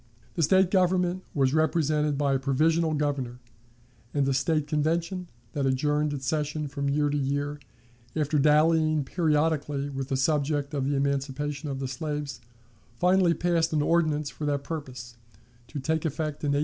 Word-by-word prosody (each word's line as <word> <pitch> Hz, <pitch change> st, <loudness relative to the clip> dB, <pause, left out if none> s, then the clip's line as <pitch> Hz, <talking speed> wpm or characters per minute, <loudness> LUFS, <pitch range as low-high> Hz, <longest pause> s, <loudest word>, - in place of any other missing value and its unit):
The 170 Hz, -, -2 dB
State 185 Hz, +4 st, +4 dB
government 185 Hz, -1 st, +2 dB
was 135 Hz, -2 st, +2 dB
represented 155 Hz, -2 st, +1 dB
by 140 Hz, -1 st, +1 dB
a 135 Hz, -, +1 dB
provisional 155 Hz, +4 st, +2 dB
Governor; 140 Hz, -5 st, -2 dB, 0.8 s
and 140 Hz, -2 st, +2 dB
a 135 Hz, -, +2 dB
State 145 Hz, +3 st, +1 dB
Convention, 165 Hz, +4 st, -1 dB, 0.3 s
that 140 Hz, -2 st, 0 dB
adjourned 150 Hz, +3 st, +1 dB
its 135 Hz, -2 st, -5 dB
sessions 150 Hz, 0 st, -2 dB
from 140 Hz, -1 st, -1 dB
year 145 Hz, +1 st, +2 dB
to 145 Hz, -, 0 dB
year, 145 Hz, +2 st, -2 dB, 0.6 s
after 150 Hz, -1 st, +1 dB
dallying 155 Hz, +1 st, +4 dB
periodically 150 Hz, -2 st, 0 dB
with 135 Hz, -1 st, -4 dB
the 135 Hz, -, -1 dB
subject 145 Hz, +1 st, 0 dB
of 140 Hz, -2 st, -1 dB
the 145 Hz, -, +1 dB
emancipation 140 Hz, +2 st, -2 dB
of 135 Hz, -, -3 dB
the 135 Hz, 0 st, -3 dB
slaves, 145 Hz, 0 st, -4 dB, 0.5 s
finally 180 Hz, -1 st, +3 dB
passed 165 Hz, -2 st, +1 dB
an 150 Hz, -1 st, +2 dB
ordinance 155 Hz, -3 st, +1 dB
for 150 Hz, -, -6 dB
that 145 Hz, -1 st, -1 dB
purpose, 130 Hz, -7 st, -7 dB, 0.5 s
to 150 Hz, -, -6 dB
take 160 Hz, +3 st, -1 dB
effect 155 Hz, -1 st, -3 dB
in 145 Hz, -1 st, +1 dB
1870. -, -, +2 dB
150 Hz, 160 wpm, -27 LUFS, 140-160 Hz, 0.8 s, State